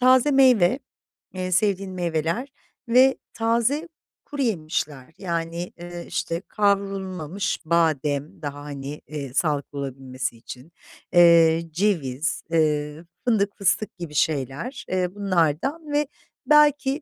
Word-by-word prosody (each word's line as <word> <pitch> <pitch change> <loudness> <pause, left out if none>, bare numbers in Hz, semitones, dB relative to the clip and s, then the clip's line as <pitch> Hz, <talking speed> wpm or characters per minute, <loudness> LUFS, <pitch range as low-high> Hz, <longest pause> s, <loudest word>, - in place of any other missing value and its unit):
taze 255 +2 +5
meyve, 255 -6 +5 0.6
eee, 185 0 -3
sevdiğin 195 0 +1
meyveler 175 - -1 0.4
ve 260 +3 +5 0.2
taze 235 +8 +1 0.4
kuruyemişler. 160 - -2
Yani, 170 -1 -3
eee, 175 0 -7
işte, 165 +1 -2
kavrulmamış 195 -3 -1
badem 155 -3 0
daha 145 -1 -5
hani, 145 0 -7
eee, 140 -4 -6
sağlıklı 145 -2 -1
olabilmesi 130 -3 -4
için, 125 +7 -11 0.4
eee, 170 -1 +6
ceviz, 165 -6 -1
eee, 150 -1 +1 0.2
fındık, 210 -4 +1
fıstık 195 0 0
gibi 170 -4 -7
şeyler, 150 - -1
eee, 185 0 -1
bunlardan 200 - 0
ve 295 -1 +2 0.4
belki 295 -1 +4
175 Hz, 105 wpm, -24 LUFS, 150-215 Hz, 0.6 s, eee